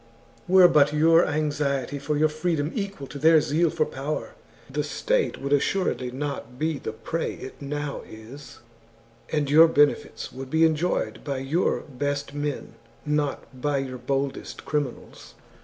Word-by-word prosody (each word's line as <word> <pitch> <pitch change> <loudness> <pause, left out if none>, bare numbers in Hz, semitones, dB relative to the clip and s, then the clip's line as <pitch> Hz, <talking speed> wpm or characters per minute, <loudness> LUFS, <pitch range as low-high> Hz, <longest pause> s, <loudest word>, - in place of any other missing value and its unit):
Were 185 0 +8
but 150 -3 +4
your 165 +3 +5
anxiety 145 -2 -1
for 145 +1 -1
your 155 +1 +4
freedom 155 -1 -1
equal 200 - -4
to 140 +1 -9
their 160 +2 +6
zeal 160 +3 +1
for 155 - 0
power, 140 +3 -4 0.3
the - - -2
state - - 0
would 140 +1 -1
assuredly 140 -4 +1
not 135 -1 -5
be 155 0 -1
the - - -4
prey 160 +9 -3
it 130 - -10
now 145 0 -4
is, 115 +7 -12 0.7
and 150 -2 0
your 160 +4 +7
benefits 145 -2 +1
would 130 0 -8
be 160 +3 +4
enjoyed 160 -8 0
by 140 -2 -3
your 135 +7 0
best 145 +1 -3
men, 145 -1 -4 0.3
not 145 -3 -2
by 145 0 +1
your 130 -2 -4
boldest 135 +2 -3
criminals. 145 -5 -4
145 Hz, 150 wpm, -25 LUFS, 135-155 Hz, 0.7 s, Were